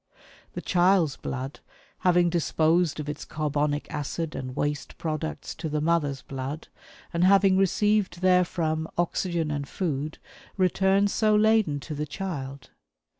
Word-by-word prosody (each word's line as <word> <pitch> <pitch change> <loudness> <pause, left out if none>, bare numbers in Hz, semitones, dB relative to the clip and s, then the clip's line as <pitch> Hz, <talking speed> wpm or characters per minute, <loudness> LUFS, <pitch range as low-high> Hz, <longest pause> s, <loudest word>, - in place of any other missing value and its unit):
The - - -6
child's 175 -4 +3
blood, 135 +2 -5 0.4
having 175 -2 +3
disposed 165 -1 +2
of 150 - -4
its 150 0 -5
carbonic 150 -1 -1
acid 155 +2 -3
and 130 -1 -5
waste 145 -1 -3
products 155 -1 -4
to 160 -1 -5
the 150 0 -1
mother's 150 -4 0
blood, 135 +3 -6 0.4
and 170 +1 +1
having 195 0 +5
received 205 +1 +2
therefrom 175 -3 +2
oxygen 170 -2 0
and 145 -1 -3
food, 155 -4 -3 0.4
returns 190 +2 +3
so 215 -1 +3
laden 215 -8 +3
to 155 - -6
the 150 +1 -3
child. 140 -6 -6
160 Hz, 130 wpm, -26 LUFS, 150-185 Hz, 0.4 s, having